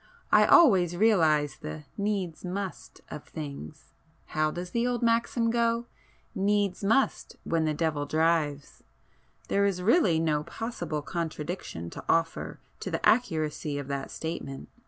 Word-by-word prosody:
I - - +6
always 190 - +6
realize 160 -9 +3
the 75 0 -7
'needs 200 -5 -2
must' 190 +1 -5
of 150 - -7
things—how 150 - -5
does 175 +3 -6
the 235 +1 +1
old 245 -1 -1
maxim 230 0 +2
go—'needs 210 -4 -1
must 225 +7 +1
when 165 -1 0
the 155 -1 0
devil 150 -2 -1
drives.' 155 -2 0 0.7
There 200 - +2
is 190 -3 0
really 195 - +4
no 155 -2 +1
possible 170 -4 -4
contradiction 160 - -5
to - - -8
offer 165 0 0 0.2
to - - -4
the - - -2
accuracy 155 -9 +1
of 140 -1 -6
that 140 -1 -3
statement. 160 -4 -6
170 Hz, 130 wpm, -28 LUFS, 150-210 Hz, 0.7 s, I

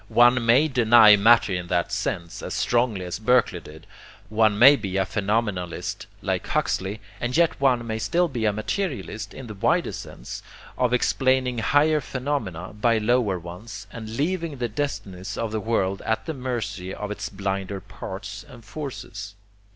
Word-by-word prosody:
One 120 0 +5
may 125 +7 +5
deny 120 -5 +7
matter 115 0 +5
in 90 -1 -3
that 85 -1 0
sense, 85 -1 -3
as - - -5
strongly 120 -6 +1
as 90 +2 -4
Berkeley 110 -5 +2
did, 80 -1 -13 0.4
one 110 -1 +3
may 135 +6 +9
be 100 -6 -3
a 95 - +2
phenomenalist 100 -4 -2 0.2
like - - -1
Huxley, 95 +3 -1 0.2
and 125 +4 -1
yet 170 -4 +2
one 125 -4 +3
may 110 -1 -3
still 175 +9 +1
be 120 -7 -3
a 105 - +4
materialist 110 - -3
in 130 - -8
the 110 - -7
wider 95 - +1
sense, - - -8 0.3
of 125 -1 +1
explaining 130 0 +2
higher 150 +5 +3
phenomena 125 - -4
by 115 +2 +2
lower 110 -3 +2
ones, 90 +5 -9
and 110 0 -7
leaving 165 -1 -1
the 120 -1 -1
destinies 100 -7 -4
of 115 -2 -2
the 110 -1 -2
world 100 -3 0
at 110 - -1
the 160 - -3
mercy 115 -8 -4
of 105 0 -5
its 105 - -4
blinder 95 0 -3
parts 95 +2 -8
and 120 -3 -13
forces. 110 -6 -7
110 Hz, 165 wpm, -24 LUFS, 100-125 Hz, 0.4 s, may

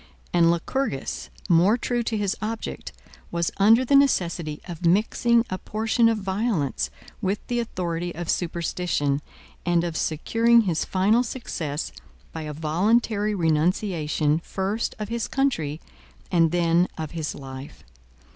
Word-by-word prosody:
And 170 -1 +5
Lycurgus, 170 - -2 0.2
more 185 +5 +5
true 245 0 -1
to 225 -1 -1
his 200 -2 0
object, 220 +1 -4 0.4
was 170 -1 -1
under 225 +6 +5
the 280 - +3
necessity 170 - +2
of 175 -1 -7
mixing 225 +6 +3
a 185 - -2
portion 225 +2 +2
of 225 - +1
violence 195 - -1 0.3
with 195 0 0
the 240 -1 -1
authority 175 -6 -3
of 175 0 -5
superstition, 165 -5 -1 0.4
and 175 -1 +2
of 170 -2 -3
securing 230 +11 +3
his 180 -7 0
final 200 +5 +3
success 165 - -4 0.4
by 160 - -6
a 155 -1 -5
voluntary 205 +7 +1
renunciation, 160 -2 +1
first 195 +6 -2
of 210 -1 -5
his 235 -1 -2
country, 165 - 0 0.5
and 165 -2 +4
then 170 +1 +3
of 155 -2 -4
his 160 -3 -3
life. 135 0 -9
180 Hz, 135 wpm, -25 LUFS, 165-225 Hz, 0.5 s, And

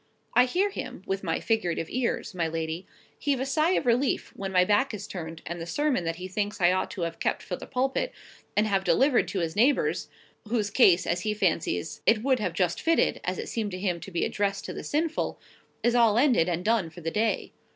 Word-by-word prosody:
I 250 - +6
hear 375 +10 +1
him, 190 - -6
with 195 0 -2
my 165 -3 -1
figurative 180 -8 0
ears, 240 -2 -2
my 170 -3 0
lady, 160 +2 -4 0.3
heave 280 -3 0
a 265 - -1
sigh 310 +5 +2
of - - 0
relief 245 +3 +1
when 195 -1 -4
my 180 -1 +4
back 210 +5 +2
is 200 - -6
turned, 165 -3 -7
and 170 0 -5
the 165 - -5
sermon 265 - 0
that 165 0 -1
he 180 +2 -6
thinks 205 +3 -3
I 175 -1 +5
ought 185 - 0
to 190 - -6
have 165 -1 -3
kept - - -1
for - - -4
the - - -10
pulpit, 265 - 0 0.5
and 210 - +4
have 195 -2 +1
delivered 265 +5 +3
to 190 - -2
his 165 0 -2
neighbours 250 +7 +2 0.4
(whose 215 -2 0
case, 185 -6 +5
as 175 +1 0
he 215 -1 -1
fancies, 165 -5 -1
it 225 -1 +4
would 260 -2 +2 0.2
just 175 -2 +1
have - - -9
fitted, 330 0 +2
as 185 +1 -2
it - - -5
seemed 220 -3 -2
to 185 - -4
him 180 -3 -1
to 170 - -9
be 170 -3 0
addressed 200 -1 -1
to - - -5
the - - -6
sinful), 320 +2 -1 0.4
is 240 - +3
all 230 -3 +4
ended, 240 - +4
and 175 +1 -2
done, 220 -6 +2
for 160 +2 -12
the 165 0 -2
day. 220 +3 0
205 Hz, 230 wpm, -27 LUFS, 175-245 Hz, 0.5 s, I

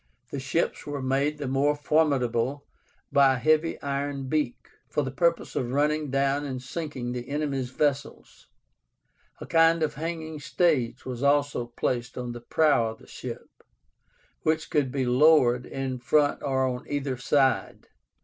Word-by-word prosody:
The 140 - -3
ships 135 +5 -1
were 145 -1 -3
made 135 +3 0
the 145 -2 -4
more 140 +3 +2
formidable 140 -4 +1 0.5
by 135 -1 +5
a - - -3
heavy 155 +4 +2
iron 140 -1 -3
beak, 145 -4 -2 0.2
for 150 - 0
the 130 - -4
purpose 170 +4 0
of 120 - -1
running 150 +2 +1
down 140 +1 +1
and 130 -3 -4
sinking 130 -2 -5
the 125 0 -5
enemy's 140 -3 -2
vessels; 140 +1 -2 0.9
a - - -7
kind 165 0 +4
of 155 - 0
hanging 160 0 -5
stage 145 -6 0
was 125 -2 -5
also 140 -3 +2
placed 120 +1 -3
on 125 -1 -4
the 120 0 -8
prow 140 -2 +2
of 110 - -8
the - - -18
ship, - - -9 0.8
which 160 0 0
could 140 -4 +1
be 135 -1 -1
lowered 125 -1 +4
in 135 -1 -4
front 145 +4 +2
or 135 -2 +1
on 125 -1 -3
either 140 -2 -2
side. 135 +2 +1
140 Hz, 155 wpm, -26 LUFS, 130-150 Hz, 0.9 s, by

